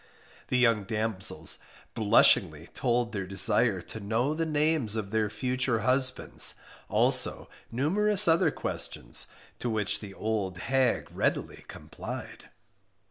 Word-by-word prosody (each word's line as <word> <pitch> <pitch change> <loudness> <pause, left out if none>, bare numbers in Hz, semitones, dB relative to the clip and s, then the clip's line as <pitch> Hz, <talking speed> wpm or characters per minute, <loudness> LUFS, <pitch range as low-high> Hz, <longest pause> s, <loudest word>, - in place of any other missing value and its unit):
The 125 - 0
young 115 -5 +2
damsels 110 -2 -3 0.3
blushingly 95 -7 +4
told 120 -1 0
their 100 -3 -4
desire 105 +1 +4
to 110 - -7
know 115 +7 -1
the 165 +1 -2
names 150 -7 +1
of 105 -3 -4
their 110 -1 0
future 125 +1 -1
husbands, 130 +2 +1 0.3
also - - +3 0.2
numerous 200 - +2
other 165 0 +4
questions, - - -4 0.3
to 120 - -3
which 110 -2 -1
the 100 -2 -10
old 105 -4 -3
hag 130 +4 0
readily - - -2
complied. - - -9
115 Hz, 120 wpm, -28 LUFS, 105-130 Hz, 0.3 s, blushingly